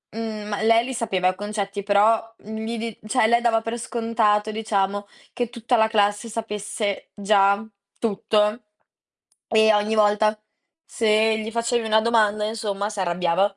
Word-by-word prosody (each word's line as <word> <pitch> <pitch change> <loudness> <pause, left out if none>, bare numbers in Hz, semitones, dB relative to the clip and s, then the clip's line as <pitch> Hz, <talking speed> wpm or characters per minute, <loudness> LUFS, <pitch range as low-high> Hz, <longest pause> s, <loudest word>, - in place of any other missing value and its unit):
mhmm, 220 -2 -5
ma 205 -1 -3
lei 230 +1 +4
li 260 - -5
sapeva 195 -6 0
i 185 - -3
concetti, 205 0 -4
però, 220 +3 +2
mhmm, 220 +1 -7
li 230 +1 -3
di 225 -1 -5
cioè 220 0 +2
lei 235 +1 +3
dava 230 -2 +2
per 230 +1 -4
scontato, 225 -2 0
diciamo, 205 -2 -1 0.3
che 245 -2 -2
tutta 240 +1 -1
la 220 0 +3
classe 205 +1 +1
sapesse 210 -2 -4
già 200 0 +3 0.4
tutto 210 +1 0 0.9
e 220 0 +4
ogni 210 +1 +1
volta 215 0 +2 0.5
se 220 -1 +2
gli 220 +1 -5
facevi 235 0 -1
una 220 0 +4
domanda, 215 -2 +2
insomma, 210 -2 -3
si 210 - -8
arrabbiava. 180 +2 0
215 Hz, 155 wpm, -23 LUFS, 205-225 Hz, 0.9 s, lei